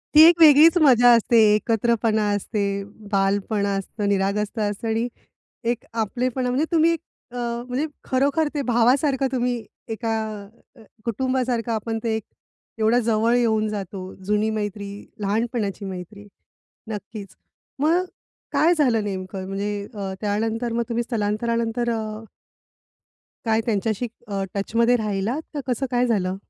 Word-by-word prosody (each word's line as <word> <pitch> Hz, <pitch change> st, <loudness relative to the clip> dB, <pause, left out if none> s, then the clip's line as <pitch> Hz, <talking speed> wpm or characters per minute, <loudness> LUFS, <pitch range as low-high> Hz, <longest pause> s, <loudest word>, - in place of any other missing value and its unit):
ती 305 Hz, -, +10 dB
एक 340 Hz, 0 st, +5 dB
वेगळीच 315 Hz, +2 st, +8 dB
मजा 245 Hz, -4 st, +6 dB
असते, 230 Hz, +1 st, +3 dB, 0.2 s
एकत्रपणा 225 Hz, 0 st, +1 dB
असते, 200 Hz, -1 st, -2 dB, 0.3 s
बालपणा 200 Hz, +1 st, +1 dB
असतं, 205 Hz, +2 st, -4 dB
निरागसता 205 Hz, +3 st, 0 dB
असतं 210 Hz, +3 st, -5 dB
आणि 225 Hz, +2 st, 0 dB, 0.6 s
एक 240 Hz, -, -5 dB, 0.2 s
आपलेपणा. 250 Hz, +3 st, -1 dB
म्हणजे 275 Hz, +6 st, +1 dB
तुम्ही 335 Hz, 0 st, +4 dB, 0.4 s
अ, -, -, -6 dB, 0.3 s
म्हणजे 255 Hz, +5 st, -1 dB, 0.2 s
खरोखर 280 Hz, +4 st, +1 dB
ते 290 Hz, -, -1 dB
भावासारखं 265 Hz, +3 st, +3 dB
तुम्ही 250 Hz, -1 st, 0 dB, 0.4 s
एका 225 Hz, 0 st, -2 dB, 0.6 s
अ, 230 Hz, -, -17 dB, 0.2 s
कुटुंबासारखं 245 Hz, 0 st, -1 dB
आपण 225 Hz, 0 st, -2 dB
ते 225 Hz, -1 st, 0 dB
एक 220 Hz, -, -3 dB, 0.6 s
एवढा 220 Hz, +3 st, +3 dB
जवळ 230 Hz, +1 st, +2 dB
येऊन 220 Hz, -3 st, +2 dB
जातो, 190 Hz, -2 st, -6 dB
जुनी 210 Hz, +2 st, +1 dB
मैत्री, 205 Hz, -2 st, -3 dB, 0.3 s
लहानपणाची 210 Hz, 0 st, -1 dB
मैत्री, 190 Hz, +2 st, -8 dB, 0.6 s
नक्कीच. 205 Hz, -2 st, -7 dB, 0.4 s
मग 330 Hz, +5 st, +3 dB, 0.5 s
काय 340 Hz, +3 st, +4 dB
झालं 240 Hz, -7 st, +2 dB
नेमकं? 190 Hz, -1 st, -5 dB
म्हणजे 200 Hz, +1 st, -3 dB
अ, 195 Hz, -2 st, -4 dB
त्यानंतर 225 Hz, +3 st, -1 dB
मग 235 Hz, 0 st, 0 dB
तुम्ही 235 Hz, +1 st, 0 dB
स्थलांतरानंतर 230 Hz, +1 st, -1 dB
अ 220 Hz, -1 st, -4 dB, 1.2 s
काय 225 Hz, 0 st, +2 dB
त्यांच्याशी 220 Hz, +1 st, -1 dB, 0.2 s
अ, 195 Hz, -1 st, -2 dB
टचमध्ये 230 Hz, +4 st, +2 dB
राहिलात 215 Hz, +5 st, -2 dB
का 295 Hz, -, -3 dB
कसं 250 Hz, +2 st, 0 dB
काय 245 Hz, 0 st, +2 dB
झालं? 190 Hz, -5 st, 0 dB
225 Hz, 130 wpm, -23 LUFS, 205-245 Hz, 1.2 s, ती